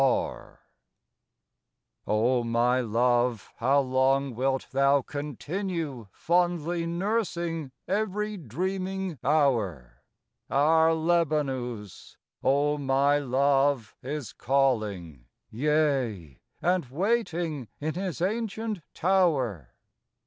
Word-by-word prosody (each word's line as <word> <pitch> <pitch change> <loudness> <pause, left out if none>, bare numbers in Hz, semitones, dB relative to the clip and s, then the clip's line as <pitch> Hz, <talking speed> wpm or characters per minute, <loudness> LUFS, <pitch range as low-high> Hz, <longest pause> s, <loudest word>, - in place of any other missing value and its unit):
R. 135 - -1 1.4
O 120 +3 +2
my 120 +2 +2
Love, 120 0 +1
how 135 +4 +3
long 135 +1 +1
wilt 130 +2 -1
thou 140 0 +3
continue 150 - -4
Fondly 175 -1 0
nursing 170 -5 -2 0.2
every 210 +1 -1
dreaming 185 - -3
Hour! 105 - +1 0.5
Our 160 +3 +4
Lebanus, 140 - -1 0.3
O 145 +2 +2
my 140 +1 +2
Love, 135 -2 +1
is 140 -1 -5
calling. 105 - 0 0.3
Yea, 130 - 0 0.2
and 180 -2 +2
waiting 170 - -1
in 155 +2 -2
his 180 -2 -3
ancient 220 0 -2
Tower. 145 - +1
140 Hz, 85 wpm, -27 LUFS, 125-170 Hz, 1.4 s, Our